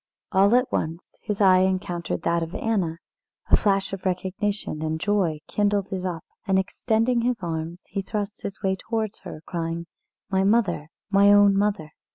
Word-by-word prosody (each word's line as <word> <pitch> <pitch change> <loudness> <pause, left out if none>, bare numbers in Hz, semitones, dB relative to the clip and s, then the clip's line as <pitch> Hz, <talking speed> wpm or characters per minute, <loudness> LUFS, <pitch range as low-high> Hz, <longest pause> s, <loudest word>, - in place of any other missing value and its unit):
All 200 +4 +5
at 250 +1 +2
once 165 +2 -3
his 210 -1 -3
eye 185 -2 +6
encountered 185 -2 -1
that 170 0 +1
of 165 +3 -5
Anna. 190 -9 0 0.5
A - - +9
flash 195 -2 +1
of 195 - -5
recognition 190 -1 -2
and 160 0 -2
joy 180 -6 0
kindled 205 -2 0
it 185 -1 -3
up, 175 -3 -3 0.2
and, 190 -1 +3
extending 225 +5 +1
his 245 0 +1
arms, 165 +1 -4
he 195 +1 -3
thrust 205 +1 -4
his 200 - -7
way 190 0 +2
towards 220 +1 -3
her, 155 - -9
crying: 170 0 -3 0.5
"My 190 0 +2
mother! 195 -8 +2 0.2
my 200 0 +6
own 205 -1 +6
mother!" 200 -6 0
195 Hz, 170 wpm, -25 LUFS, 170-205 Hz, 0.5 s, A